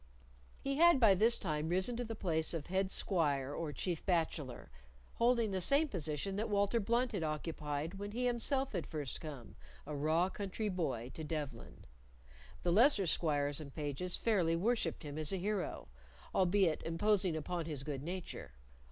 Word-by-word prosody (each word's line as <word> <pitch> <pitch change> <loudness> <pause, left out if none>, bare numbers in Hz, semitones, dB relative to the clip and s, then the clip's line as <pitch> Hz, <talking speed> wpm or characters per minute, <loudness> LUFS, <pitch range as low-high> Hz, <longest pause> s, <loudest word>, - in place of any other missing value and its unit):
He 275 0 -2
had 340 -3 +6
by 220 -5 +7
this 225 +5 +3
time 155 -4 -2
risen 185 +7 +1
to 245 - -1
the 225 -1 -5
place 165 -5 0
of 155 -3 -4
head 190 +1 0
squire 145 -9 0
or 160 -1 -3
chief 165 +4 -2
bachelor, 160 -8 -1 0.4
holding 235 -2 +2
the 190 -1 -1
same 285 - +4
position 165 - -2
that 220 +2 -1
Walter 205 +2 +2
Blunt 235 +4 +1
had 200 - -2
occupied 155 +2 -3
when 205 0 -4
he 245 +3 -1
himself 260 +3 +1
had 175 -5 -3
first 145 -5 -4
come, 145 -7 -8 0.3
a 150 +1 -5
raw 155 +5 +2
country 200 +2 -3
boy, 135 - -2
to 160 - -6
Devlen. 150 -6 -5 0.8
The 175 - +2
lesser 215 +1 +5
squires 145 -3 +1
and 140 -2 -9
pages 150 +4 0
fairly 180 -8 +2
worshipped 200 -2 0
him 145 0 -5
as 155 -1 +2
a 195 - 0
hero, 200 +1 -2 0.5
albeit 185 -3 +3
imposing 185 +1 +1
upon 170 +2 -3
his 145 -4 -4
good 140 -2 -4
nature. 180 +4 -6
175 Hz, 170 wpm, -35 LUFS, 155-205 Hz, 0.8 s, by